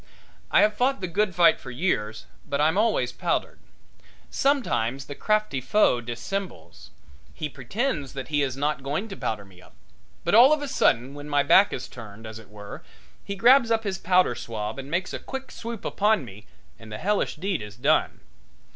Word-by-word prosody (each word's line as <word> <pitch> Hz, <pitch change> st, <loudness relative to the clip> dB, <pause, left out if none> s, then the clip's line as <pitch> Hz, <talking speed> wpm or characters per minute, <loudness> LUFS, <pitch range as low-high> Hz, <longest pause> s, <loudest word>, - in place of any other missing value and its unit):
I -, -, +5 dB
have 215 Hz, -, +4 dB
fought 255 Hz, +4 st, +1 dB
the 185 Hz, -, -3 dB
good 190 Hz, +2 st, 0 dB
fight 170 Hz, -2 st, +5 dB
for 130 Hz, -, -10 dB
years, 120 Hz, -, -2 dB, 0.2 s
but 140 Hz, -, -1 dB
I'm 155 Hz, +3 st, +3 dB
always 210 Hz, -, +1 dB
powdered. 170 Hz, +8 st, -2 dB, 0.7 s
Sometimes 135 Hz, -, 0 dB
the 145 Hz, -, -7 dB
crafty 215 Hz, -5 st, 0 dB
foe 130 Hz, -, +3 dB
dissembles. 120 Hz, -, -6 dB, 0.5 s
He 155 Hz, -, -3 dB
pretends 145 Hz, -, -3 dB
that 135 Hz, +1 st, -6 dB
he 145 Hz, -1 st, +1 dB
is 135 Hz, -2 st, -1 dB
not 150 Hz, +1 st, -1 dB
going 150 Hz, +11 st, -3 dB
to 195 Hz, -, -6 dB
powder 105 Hz, -, -3 dB
me 95 Hz, -2 st, -18 dB
up. -, -, -19 dB, 0.5 s
But 175 Hz, -, 0 dB
all 250 Hz, +7 st, +8 dB
of 305 Hz, -, 0 dB
a -, -, -3 dB
sudden 130 Hz, -, +1 dB
when 145 Hz, +1 st, -9 dB
my 145 Hz, -1 st, +3 dB
back 190 Hz, +8 st, +5 dB
is 130 Hz, -, -5 dB
turned, 110 Hz, -3 st, -11 dB
as 110 Hz, 0 st, -8 dB
it 110 Hz, -3 st, -16 dB
were, 105 Hz, -1 st, -10 dB, 0.4 s
he 200 Hz, -, -5 dB
grabs 235 Hz, +3 st, +5 dB
up 225 Hz, -1 st, +1 dB
his 195 Hz, -3 st, -3 dB
powder 180 Hz, -6 st, +3 dB
swab 110 Hz, 0 st, -5 dB
and 135 Hz, +1 st, -8 dB
makes 175 Hz, +4 st, -2 dB
a -, -, -3 dB
quick 265 Hz, 0 st, -7 dB
swoop 230 Hz, -2 st, -7 dB
upon 210 Hz, -6 st, +1 dB
me 105 Hz, 0 st, -13 dB, 0.3 s
and 110 Hz, -1 st, -12 dB
the 105 Hz, -, -5 dB
hellish 205 Hz, -, 0 dB
deed 185 Hz, -, -2 dB
is 105 Hz, -1 st, -9 dB
done. 140 Hz, +7 st, +1 dB
150 Hz, 190 wpm, -25 LUFS, -, 0.7 s, all